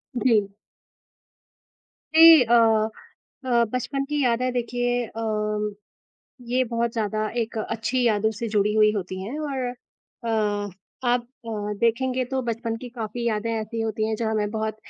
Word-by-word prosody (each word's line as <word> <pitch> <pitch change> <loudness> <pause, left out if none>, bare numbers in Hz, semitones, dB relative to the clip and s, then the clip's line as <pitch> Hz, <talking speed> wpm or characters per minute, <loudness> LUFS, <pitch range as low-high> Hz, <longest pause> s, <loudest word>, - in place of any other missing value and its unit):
जी। 225 -5 +3 1.7
जी, 325 -3 +10
अ 235 0 +1 0.9
अ, - - -3 0.2
बचपन 275 +2 -1
की 295 -1 0
यादें 250 +1 +1
देखिए 245 0 -1
अ, 210 -2 -2 0.7
ये 255 +2 +2
बहुत 235 -1 -1
ज़्यादा 215 -1 -1
एक 230 -1 -2
अच्छी 230 +4 -1
यादों 220 -1 +2
से 225 +2 -4
जुड़ी 210 0 +1
हुई 215 -1 +5
होती 185 -2 -4
हैं 235 +10 -5
और 275 -4 -2
अ 215 -4 -4 0.4
आप 245 0 +2 0.2
अ, - - -4 0.3
देखेंगे 255 +2 +1
तो 265 +2 -2
बचपन 230 -1 -3
की 245 +2 -8
काफ़ी 235 0 -5
यादें 220 0 -1
ऐसी 225 +1 -3
होती 220 -1 -1
हैं 220 - 0
जो 225 0 -1
हमें 210 -1 0
बहुत 220 0 -3
230 Hz, 145 wpm, -24 LUFS, 215-245 Hz, 1.7 s, जी